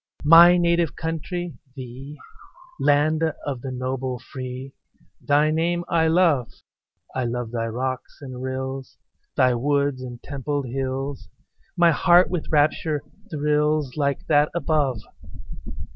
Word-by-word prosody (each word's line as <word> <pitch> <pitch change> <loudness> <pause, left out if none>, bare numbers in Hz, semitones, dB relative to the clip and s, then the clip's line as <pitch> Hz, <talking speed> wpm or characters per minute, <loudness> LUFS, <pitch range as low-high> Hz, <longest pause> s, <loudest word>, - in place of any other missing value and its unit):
My 170 +3 +8
native 170 -4 +1
country, 165 +2 -4 0.2
thee 130 +3 -9 0.6
Land 150 +2 +2 0.2
of 135 -4 -4
the 135 - -5
noble 130 0 -3
free 130 +2 -8 0.5
Thy 150 +2 +3
name 170 +2 0
I 160 -1 +3
love; 160 -7 +3 0.6
I 130 -1 -1
love 120 -1 -3
thy 115 -1 -2
rocks 130 +3 -4
and 130 -3 -8
rills, 130 0 -5 0.4
Thy 130 -1 +4
woods 140 +1 0
and 125 -2 -8
templed 140 0 -3
hills; 135 +2 -4 0.5
My 170 -1 +5
heart 175 +3 +4
with 180 -4 -3
rapture 150 0 +1 0.3
thrills, 150 -3 0
Like 140 -2 -1
that 150 -1 +3
above. 145 -7 0
145 Hz, 120 wpm, -23 LUFS, 130-160 Hz, 0.6 s, My